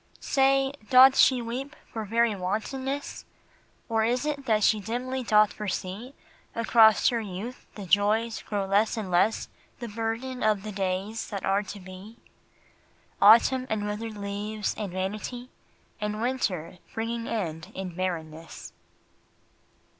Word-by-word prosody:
Say, 270 0 +2 0.2
doth 260 +1 +8
she 255 -3 +5
weep 265 +6 -5 0.2
for 220 -2 -4
very 230 +1 +2
wantonness? 260 +9 -3 0.6
Or 225 -1 +1
is 245 +5 0
it 285 -3 -3
that 215 -2 +2
she 215 - +4
dimly 250 +5 -3
doth 215 -3 +4
foresee 210 +5 -5 0.4
Across 225 -2 +5
her 235 - -1
youth 215 +5 -7
the 205 - -7
joys 215 +4 +2
grow 205 -2 -2
less 205 +4 +2
and 200 -4 -4
less 195 +6 +2 0.3
The 240 - -6
burden 230 +4 -4
of 210 -2 +1
the 215 - -5
days 195 +2 -3
that 200 -3 -4
are 195 +1 +2
to 200 0 -8
be: 190 +4 -11 1.0
Autumn 235 +5 +6
and 215 -1 -1
withered 210 +1 -4
leaves 205 +1 -3
and 205 -4 -5
vanity, 210 +7 -4 0.5
And 210 0 -3
winter 195 -9 -2 0.2
bringing 230 +1 -3
end 180 -4 -4
in 185 -2 -5
barrenness. 165 -3 -5
215 Hz, 135 wpm, -27 LUFS, 195-235 Hz, 1.0 s, doth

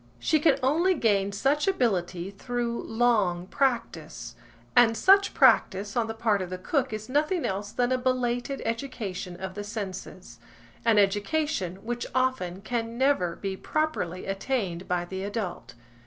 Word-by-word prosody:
She 310 - +2
can 295 -3 +4
only 335 +8 +3
gain 200 -7 +2
such 275 - +1
ability 190 - 0
through 235 +3 -3
long 215 -7 +1
practice, 215 - -2 0.4
and 230 -2 +6
such 395 +1 +5
practice 200 +1 +4
on 235 -2 +1
the 225 - -5
part 220 -3 +1
of 185 - -4
the 185 - -4
cook 265 - -1
is 215 0 -5
nothing 300 +6 +1
else 200 +2 -3
than 245 0 0
a 255 - +2
belated 250 +1 -1
education 225 -7 -4
of 190 +1 -6
the 205 +1 -5
senses–an 185 - -5
education 205 - +1
which 240 +1 -3
often 255 -9 0
can 230 0 -3
never 255 -11 +2
be 195 -1 -4
properly 190 - -2
attained 195 -3 -2
by 175 -1 0
the 190 +2 -5
adult. 200 - -5
220 Hz, 145 wpm, -27 LUFS, 190-255 Hz, 0.4 s, and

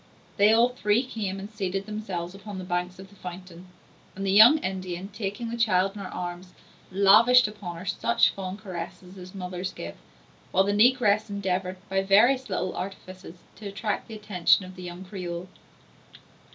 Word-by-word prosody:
They 205 +1 +6
all 230 +2 +5
three 235 -1 +1
came 210 -6 -4
and 195 - -6
seated 195 -2 -3
themselves 195 -5 -5
upon 200 0 -9
the 185 - -6
banks 180 0 -3
of 190 0 -12
the 200 - -19
fountain; 180 -1 -10 0.5
and 195 +1 -4
the 195 - +1
young 220 +9 +8
Indian, 185 - -4
taking 210 +2 -5
the - - -3
child 195 -4 +2
in 205 - -8
her 190 - -5
arms, 180 +1 -6 0.4
lavished 215 +6 +6
upon 205 -5 -7
her 175 - -9
such 200 +5 +2
fond 190 0 -6
caresses 180 -1 -8
as 185 +1 -11
mothers 180 0 -4
give; 85 0 -8 0.5
while 190 - +4
the 200 +1 0
negress 215 -1 +3
endeavored 190 -2 -2
by 195 -1 0
various 235 +7 +4
little 185 -1 -2
artifices 185 -2 -8 0.2
to 215 - -8
attract 200 +1 -3
the 225 - -8
attention 195 -3 +2
of 185 0 -11
the 185 - -10
young 180 +1 -8
Creole. 180 -2 -6
195 Hz, 175 wpm, -26 LUFS, 185-210 Hz, 0.5 s, young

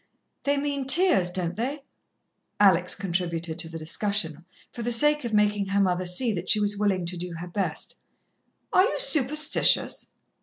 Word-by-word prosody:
"They 285 0 +1
mean 280 -1 -3
tears, 300 - +3
don't 180 -1 -3
they?" 270 +6 -4 0.8
Alex 180 -3 +3
contributed 170 -3 -4
to 165 -1 -3
the 165 - -8
discussion, 165 0 -1 0.3
for 240 - -7
the 240 +1 -2
sake 295 +3 +4
of 235 - -4
making 210 -1 +1
her 200 +1 -1
mother 185 -2 0
see 220 +6 0
that 180 0 -6
she 215 - +3
was 205 0 0
willing 200 -3 -1
to 175 +1 -4
do 175 0 -6
her 175 +2 -8
best. 175 -3 -4 0.7
"Are - - +5
you - - -1
superstitious?" 305 - +3
200 Hz, 165 wpm, -25 LUFS, 175-245 Hz, 0.8 s, Are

